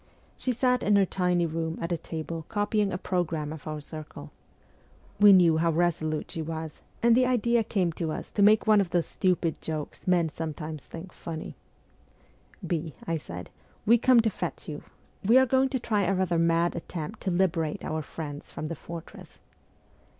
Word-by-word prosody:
She 255 - -2
sat 250 +1 +2
in 205 - +3
her 200 -1 +5
tiny 180 -2 +1
room 165 0 -3
at 170 - -3
a - - +2
table 160 0 -5
copying 205 -1 +1
a 180 - -2
programme 165 -5 -2
of 160 0 -10
our 155 0 -3
circle. 150 - -9 0.9
We 205 0 +9
knew 175 -4 +6
how 165 +1 +2
resolute 160 -2 0
s - - -7
she 165 - -3
was, 160 -1 -6 0.2
and 235 -1 +6
the 255 +1 +4
idea 235 -1 +2
came 185 -5 0
to 160 -1 -3
us - - -6
to 205 - -1
make 215 +2 +6
one 215 -2 +6
of 190 - -2
those 175 -1 +1
stupid 180 -4 0
jokes 155 +1 -5
men 175 -3 +3
sometimes 155 -1 -6
think 170 +3 -9
funny. 160 -2 -7 0.6
' - - -18
B.,' 160 -5 -3
I 165 0 0
said, 90 - -8 0.2
' - - -33
we 235 +2 +6
come 245 0 +6
to 220 -1 0
fetch - - -5
you: - - -5 0.4
we 225 +6 +6
are 260 - +6
going 265 +1 +2
to 260 -1 -1
try 215 -3 0
a 195 +2 +1
rather 180 -3 +1
mad 170 +1 +2
attempt 170 +4 -6
to - - -1
liberate 175 -4 0
our 155 0 -2
friends 145 -1 -7
from - - -6
the 165 +2 -4
fortress.' 165 +1 -10
170 Hz, 195 wpm, -27 LUFS, 160-205 Hz, 0.9 s, We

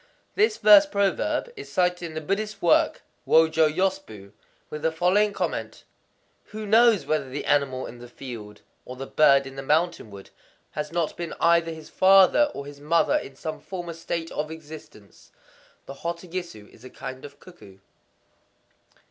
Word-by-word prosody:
This 425 +2 +2
verse 300 -1 +7
proverb 200 - -1
is - - -10
cited 180 -1 +1
in 155 - -11
the 155 - -3
Buddhist 200 +5 -3
work 175 - +2 0.2
Wōjō 160 -1 +4
Yōshū, 185 - -3 0.4
with 150 - -6
the 160 +1 +1
following 185 +6 +2
comment:—"Who 215 +1 -8
knows 225 0 +4
whether 155 -4 -1
the 140 +3 -5
animal 135 -3 0
in 120 - -10
the 120 - -11
field, 115 -5 -10 0.2
or 125 - -9
the 135 +1 -7
bird 140 -1 +4
in 135 0 -10
the - - -4
mountain 155 -2 0
wood, 100 -1 -13 0.4
has 150 0 -5
not 170 -2 -2
been 170 -1 -5
either 170 0 +3
his 160 -1 -11
father 195 +10 +5
or 140 - -6
his 145 0 -11
mother 165 +3 +2
in 135 - -7
some 155 +3 -6
former 175 -3 -7
state 165 0 -5
of 155 +1 -3
existence?"—The 150 - -14
hototogisu 170 - -6
is 110 - -19
a 130 - -10
kind 130 0 -9
of 145 0 -12
cuckoo. 140 - -16
160 Hz, 155 wpm, -25 LUFS, 140-185 Hz, 0.4 s, verse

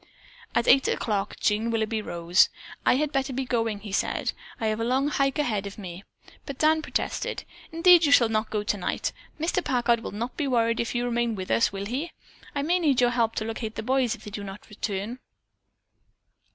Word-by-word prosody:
At 235 - +2
eight 270 - +6
o'clock 205 -2 -1
Jean 220 +2 +1
Willoughby 220 -1 0
rose. 175 -2 +3 0.4
"I - - +6
had 295 +2 0
better 270 -1 -1
be 265 +1 -2
going," 225 -4 -1
he 210 -1 -8
said. - - 0 0.3
"I 225 - -2
have 215 0 0
a - - 0
long 260 +4 +1
hike 275 -2 +1
ahead 215 -9 0
of 200 - -9
me." 185 -2 -8 0.4
But 280 -2 -5
Dan 315 +1 +3
protested. - - -2 0.3
"Indeed 335 0 +6
you 285 - +2
shall 240 -4 +7
not 220 0 -1
go 210 -1 -1
tonight. 205 -2 -2 0.3
Mr. 340 +3 0
Packard 240 -2 +2
will 230 - -6
not 235 +5 -5
be 295 - -1
worried 230 -2 +2
if 235 +1 -2
you 240 0 0
remain 235 -1 0
with 185 -2 -5
us, 230 - +3
will 195 0 -5
he? 275 +10 -3 0.4
I 280 - 0
may 350 +4 +2
need 290 -7 +2
your 245 -1 +4
help 230 -2 +1
to 215 - -2
locate 225 0 -4
the 220 - -4
boys 255 -1 +1
if - - -17
they 210 - -8
do 205 0 -5
not 195 +1 -9
soon - - -23
return." 210 +3 -4
230 Hz, 210 wpm, -26 LUFS, 215-270 Hz, 0.4 s, shall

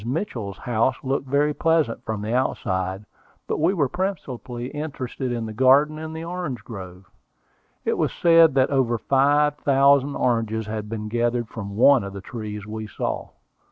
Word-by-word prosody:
Mitchell's 120 - -3
house 120 +1 0
looked 135 0 -1
very 145 +3 +2
pleasant 160 -5 +1
from 110 -2 -4
the 110 +2 -2
outside; 95 -6 -1 0.4
but - - -2
we 165 +4 +3
were 160 -8 +1
principally 130 -9 -4
interested 135 -3 -4
in 120 -2 -2
the 110 - -6
garden 140 +6 +4
and 160 0 -6
orange 165 -5 -5
grove. 95 -4 -9 0.8
It - - 0
was - - +1
said 165 -4 +5
that 130 0 +3
over 125 -4 +2
five 145 +4 +2
thousand 140 0 +3
oranges 115 -3 0
had 105 0 -5
been 110 -1 -4
gathered 120 +1 0
from 100 -2 -7
one 135 0 +6
of 100 0 -6
the 100 - -7
trees 105 -1 -6
we 110 0 -6
saw. 105 - -4
125 Hz, 160 wpm, -23 LUFS, 110-145 Hz, 0.8 s, one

